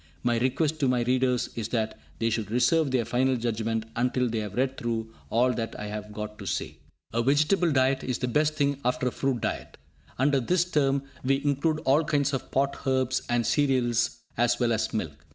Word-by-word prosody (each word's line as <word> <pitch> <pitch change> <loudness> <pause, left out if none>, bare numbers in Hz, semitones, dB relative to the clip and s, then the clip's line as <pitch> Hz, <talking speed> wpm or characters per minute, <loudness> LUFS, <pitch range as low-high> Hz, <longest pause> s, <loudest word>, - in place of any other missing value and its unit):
My 120 -1 +2
request 145 +5 0
to 140 - +2
my 125 -1 +2
readers 125 0 +1
is 115 -2 -3
that 110 -2 -1 0.2
they 115 +1 0
should 110 -3 -2
reserve 145 +6 +3
their 130 -3 +1
final 130 +3 +1
judgments 115 -1 -2
until 125 +1 +1
they 115 -1 -2
have 105 -2 -5
read 130 +1 0
through 115 -2 -3 0.2
all 125 +2 +3
that 115 -2 -4
I 105 - -4
have 105 0 -6
got 105 0 -6
to 100 - -7
say. 75 - -3 0.4
A 115 - +2
vegetable 155 +7 +3
diet 130 -1 +2
is 125 -2 -1
the 125 - -2
best 150 +4 +1 0.2
after 125 +1 +1
a - - -10
fruit 135 -3 -1
diet. - - -4 0.4
Under 140 +1 +3
this 175 +8 +1
term 140 -5 +1 0.2
we 135 +2 +1
include 150 +2 +1
all 140 +5 +4
kinds 145 -2 +1
of 135 - -3
pot 140 +1 0
herbs 130 -1 +1
and 120 -1 +1
cereals, 120 -5 +1 0.2
as 120 0 +2
well 120 -2 +2
as 110 - -1
milk. 80 -8 -4
125 Hz, 200 wpm, -27 LUFS, 115-135 Hz, 0.4 s, all